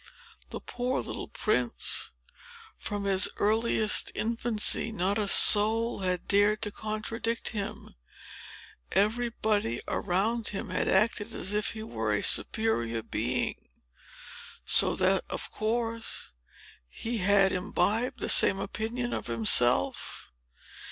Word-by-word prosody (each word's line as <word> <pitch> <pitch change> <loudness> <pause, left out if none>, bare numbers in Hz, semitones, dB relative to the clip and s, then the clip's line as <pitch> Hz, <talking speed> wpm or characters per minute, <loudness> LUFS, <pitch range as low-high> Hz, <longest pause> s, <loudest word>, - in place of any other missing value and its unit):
The - - -7
poor 250 +1 -3
little - - -6
prince! 125 - -1 0.7
From 205 -1 -4
his 195 -1 +3
earliest 220 0 +1
infancy 230 0 +1
not 200 +1 -1
a 210 - 0
soul 220 +3 +5
had 180 -2 -3
dared 205 +2 +2
to 210 - -2
contradict 220 +2 -4
him; 205 -4 -7 1.0
everybody 215 - -1
around 210 +5 -2
him 195 - -5
had - - -2
acted 215 +2 0
as 190 - -3
if 210 +1 -1
he 220 -1 -8
were 110 - -3
a 105 - -2
superior 120 - +2
being; 120 +3 -2 1.1
so - - +4
that, - - +1
of - - -5
course, 225 - -3 0.6
he 230 - -5
had 195 0 +3
imbibed 205 +6 -2
the - - -2
same 195 - +6
opinion 230 +5 -4
of - - -5
himself. 115 - +1
210 Hz, 115 wpm, -27 LUFS, 190-225 Hz, 1.1 s, same